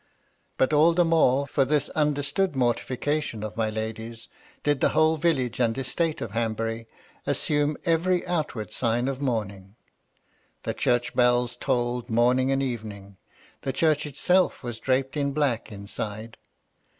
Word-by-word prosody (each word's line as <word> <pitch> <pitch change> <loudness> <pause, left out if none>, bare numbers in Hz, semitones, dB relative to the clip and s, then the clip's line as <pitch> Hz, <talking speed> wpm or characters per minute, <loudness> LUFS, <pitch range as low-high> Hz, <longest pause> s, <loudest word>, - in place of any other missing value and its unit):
But 130 - +2
all 155 +3 +5
the 175 0 +4
more, 140 -5 +3
for 140 0 +1
this 145 +2 +1
understood 150 +4 0
mortification 125 0 -1
of 105 0 -5
my 110 -1 0
lady's, 110 +1 -5 0.3
did 145 -2 +1
the - - +4
whole 155 0 +5
village 140 -8 0
and 115 -1 +1
estate 160 +4 -1
of 110 - -4
Hanbury 115 0 -2 0.4
assume 145 0 0
every 175 +2 +2
outward 150 - -3
sign 120 +1 0
of 135 0 -3
mourning. 100 -6 -3 0.9
The - - -2
church 120 0 0
bells 125 -1 +2
tolled 120 -2 -1
morning 125 +3 +3
and 135 0 +1
evening. 105 -6 -6 0.4
The 135 - -3
church 155 0 +2
itself 180 +6 +1
was 120 -2 -5
draped 135 +1 0
in 140 -1 0
black 140 -8 0
inside. 105 +2 -6
130 Hz, 140 wpm, -26 LUFS, 115-150 Hz, 0.9 s, all